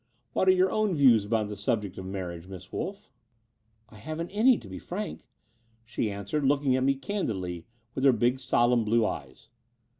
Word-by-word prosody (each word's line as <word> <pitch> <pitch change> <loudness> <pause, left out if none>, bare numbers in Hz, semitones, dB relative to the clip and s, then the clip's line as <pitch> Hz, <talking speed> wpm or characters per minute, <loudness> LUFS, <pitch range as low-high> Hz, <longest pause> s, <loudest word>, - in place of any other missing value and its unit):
What 190 - +1
are - - +9
your 190 +3 +2
views 130 - +5
upon 110 0 0
the 105 0 -6
subject 100 -1 -2
of 95 - -7
marriage, 90 -3 -6
Miss 95 -1 -10
Wolff? 200 +2 -5 0.2
' 115 0 -46
' 110 0 -38
"I 110 - -15
haven't 155 - -5
any, 225 +4 +4
to - - -11
be - - -7
frank," 205 +4 -6 0.6
she 115 -1 -2
answered, 100 +9 -3
looking 140 -1 +2
at 130 - +1
me 135 +1 +3
candidly 95 - -4 0.3
with 130 - -3
her 135 - +8
big 120 +2 +1
solemn 120 -2 +2
blue 115 +1 +2
eyes. 70 +5 -6
115 Hz, 185 wpm, -28 LUFS, 100-150 Hz, 0.6 s, are